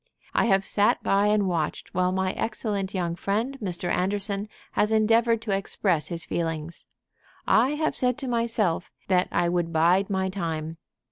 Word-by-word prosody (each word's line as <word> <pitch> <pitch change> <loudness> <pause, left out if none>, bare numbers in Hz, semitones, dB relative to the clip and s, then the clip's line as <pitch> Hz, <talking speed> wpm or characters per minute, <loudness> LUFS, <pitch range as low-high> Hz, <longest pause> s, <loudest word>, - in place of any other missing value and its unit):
I - - +3
have 195 -3 +3
sat 205 0 +2
by 200 +1 +3
and 210 -2 +2
watched 170 -4 -2
while 180 0 +1
my 190 0 0
excellent 205 -3 -2
young 170 -2 -1
friend 220 +9 -1
Mr. 180 -3 -3
Anderson 200 +2 -1 0.2
has 210 - +1
endeavored 225 +1 +3
to 220 - -3
express 195 -4 0
his 170 -2 -4
feelings. 165 -1 -4 0.6
I 255 +6 +3
have 310 -2 -1
said 250 -1 +1
to 275 -2 -5
myself 230 -8 0 0.2
that 180 -1 +3
I 175 - +1
would 170 -1 0
bide 175 +5 +3
my 190 -1 0
time. 165 -4 -3
195 Hz, 160 wpm, -26 LUFS, 175-215 Hz, 0.6 s, I